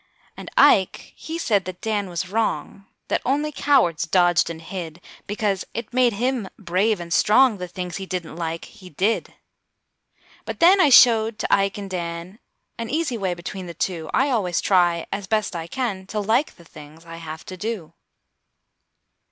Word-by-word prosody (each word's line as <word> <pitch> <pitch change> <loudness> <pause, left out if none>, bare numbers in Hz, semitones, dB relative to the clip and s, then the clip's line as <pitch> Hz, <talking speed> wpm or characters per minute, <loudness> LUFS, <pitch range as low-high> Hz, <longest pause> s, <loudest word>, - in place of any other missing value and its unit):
And - - -9
Ike, - - +4
he 325 +1 -6
said 210 - +1
that 185 -1 -7
Dan 210 -3 -2
was 175 +1 -3
wrong; 210 -2 -2 0.2
That - - 0
only 295 +4 0
cowards 175 - +2
dodged 175 -1 +3
and 165 -1 -6
hid. 165 -1 -7 0.3
Because 205 -2 -1
it 230 0 -5
made 250 -2 +3
him 240 -1 -1
brave 200 +2 0
and 170 -1 -5
strong, 220 +2 +4
The 180 - -4
things 180 -1 -6
he 190 -1 -7
didn't 175 -4 -5
like, 165 -1 -4
he 185 -2 -14
did! 195 +9 -1 1.1
But - - -6
then 370 +3 +6
I 300 - +5
showed 225 -4 +6
to - - -1
Ike 195 0 +2
and 200 -1 -6
Dan 170 +3 -5 0.4
An 230 -1 -4
easy 300 -3 -1
way 190 -5 -2
between 180 +2 -7
the 170 - -8
two: 170 -1 -3
I 275 +1 +2
always 185 -8 0
try, 175 -3 +2
as 200 -1 -4
best 215 -3 0
I 165 -1 -4
can, 195 -3 -3
To 215 - -3
like 220 +8 +1
the 170 - -18
things 155 +1 -14
I 165 0 -9
have 160 -1 -8
to 185 - -7
do. 210 -4 -5
195 Hz, 175 wpm, -23 LUFS, 170-225 Hz, 1.1 s, then